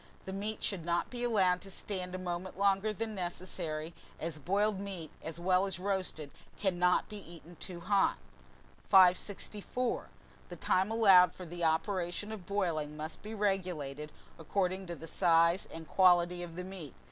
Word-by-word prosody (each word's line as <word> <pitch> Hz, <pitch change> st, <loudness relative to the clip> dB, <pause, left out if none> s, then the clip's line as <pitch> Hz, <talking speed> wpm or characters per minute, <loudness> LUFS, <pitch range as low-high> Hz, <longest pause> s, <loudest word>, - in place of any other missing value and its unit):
The 190 Hz, -, -5 dB
meat 210 Hz, +3 st, -4 dB
should 190 Hz, -5 st, +1 dB
not 170 Hz, +1 st, -1 dB
be 245 Hz, -1 st, -4 dB
allowed 190 Hz, -6 st, +2 dB
to 195 Hz, -, -8 dB
stand 185 Hz, -1 st, -3 dB
a -, -, -2 dB
moment 180 Hz, 0 st, -5 dB
longer 200 Hz, +1 st, +2 dB
than 220 Hz, +1 st, -4 dB
necessary, 175 Hz, -3 st, -4 dB, 0.3 s
as 160 Hz, -1 st, -3 dB
boiled 200 Hz, +6 st, +1 dB
meat, 190 Hz, -6 st, -6 dB
as 160 Hz, +1 st, -4 dB
well 185 Hz, +2 st, +2 dB
as 190 Hz, -4 st, -1 dB
roasted, 185 Hz, -6 st, -2 dB, 0.3 s
cannot 180 Hz, -2 st, +2 dB
be 210 Hz, -, -8 dB
eaten 170 Hz, -1 st, -13 dB
too 175 Hz, -2 st, -4 dB
hot. 195 Hz, +2 st, +2 dB, 0.7 s
564. 200 Hz, +5 st, +2 dB, 0.4 s
THE -, -, -7 dB
TIME 190 Hz, +2 st, +1 dB
ALLOWED 195 Hz, -6 st, +6 dB
FOR 185 Hz, -, -8 dB
THE 175 Hz, +1 st, -6 dB
OPERATION 175 Hz, +4 st, 0 dB
OF 195 Hz, -5 st, -8 dB
BOILING 165 Hz, -7 st, -1 dB
must 155 Hz, +1 st, -5 dB
be 215 Hz, +1 st, -7 dB
regulated 175 Hz, -8 st, -2 dB, 0.3 s
according 185 Hz, +3 st, -1 dB
to 170 Hz, -, -4 dB
the 165 Hz, -, -9 dB
size 170 Hz, +2 st, +3 dB
and 165 Hz, -1 st, -8 dB
quality 175 Hz, -1 st, +4 dB
of 170 Hz, -2 st, -7 dB
the 180 Hz, -, -5 dB
meat. 180 Hz, -7 st, -8 dB
180 Hz, 160 wpm, -32 LUFS, 170-195 Hz, 0.7 s, ALLOWED